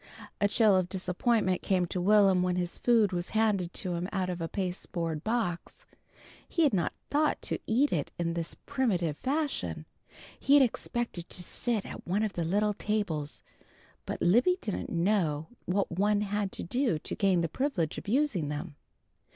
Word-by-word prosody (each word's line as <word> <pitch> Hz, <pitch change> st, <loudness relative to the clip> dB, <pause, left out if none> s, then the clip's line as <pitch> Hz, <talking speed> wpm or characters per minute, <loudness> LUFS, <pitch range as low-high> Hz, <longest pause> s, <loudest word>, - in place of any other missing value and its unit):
A 205 Hz, -, +4 dB
chill 210 Hz, -1 st, +4 dB
of 185 Hz, -1 st, +1 dB
disappointment 185 Hz, +1 st, 0 dB
came 185 Hz, -2 st, +1 dB
to 180 Hz, +1 st, -3 dB
Will'm 195 Hz, -1 st, +5 dB
when 180 Hz, 0 st, +1 dB
his 175 Hz, -1 st, -2 dB
food 225 Hz, -5 st, +4 dB
was 175 Hz, -1 st, -3 dB
handed 200 Hz, -6 st, +2 dB
to 185 Hz, -3 st, -2 dB
him 175 Hz, +2 st, -3 dB
out 185 Hz, -2 st, -1 dB
of 175 Hz, -1 st, -5 dB
a 165 Hz, -, -1 dB
pasteboard 175 Hz, -4 st, -3 dB
box. 220 Hz, -, -2 dB, 0.6 s
He 335 Hz, -, +2 dB
had 290 Hz, -, +3 dB
not 180 Hz, -3 st, 0 dB, 0.2 s
thought 300 Hz, +1 st, +2 dB
to -, -, -1 dB
eat 260 Hz, +6 st, +2 dB
it 150 Hz, -5 st, -1 dB
in 170 Hz, -1 st, -1 dB
this 165 Hz, -1 st, -4 dB
primitive 180 Hz, -, 0 dB
fashion. 290 Hz, -, -2 dB, 0.5 s
He 280 Hz, -, +4 dB
had 285 Hz, -, +8 dB
expected 235 Hz, -7 st, -3 dB
to 180 Hz, -, -3 dB
sit 225 Hz, +3 st, -2 dB
at -, -, -9 dB
one 200 Hz, +5 st, +1 dB
of 215 Hz, -2 st, -1 dB
the 170 Hz, -, -2 dB
little 205 Hz, +5 st, +1 dB
tables, 195 Hz, -9 st, -2 dB, 0.6 s
but -, -, -3 dB
Libby 245 Hz, -, +4 dB
didn't 205 Hz, -, -4 dB
know 170 Hz, -4 st, 0 dB, 0.2 s
what 195 Hz, +2 st, 0 dB
one 205 Hz, +4 st, +2 dB
had 205 Hz, -1 st, -1 dB
to -, -, -4 dB
do 245 Hz, -, 0 dB
to -, -, -6 dB
gain 190 Hz, -4 st, +2 dB
the 165 Hz, -, 0 dB
privilege 175 Hz, -, -1 dB
of -, -, -14 dB
using 220 Hz, -, +1 dB
them. 150 Hz, +1 st, -5 dB
190 Hz, 175 wpm, -29 LUFS, 175-220 Hz, 0.6 s, had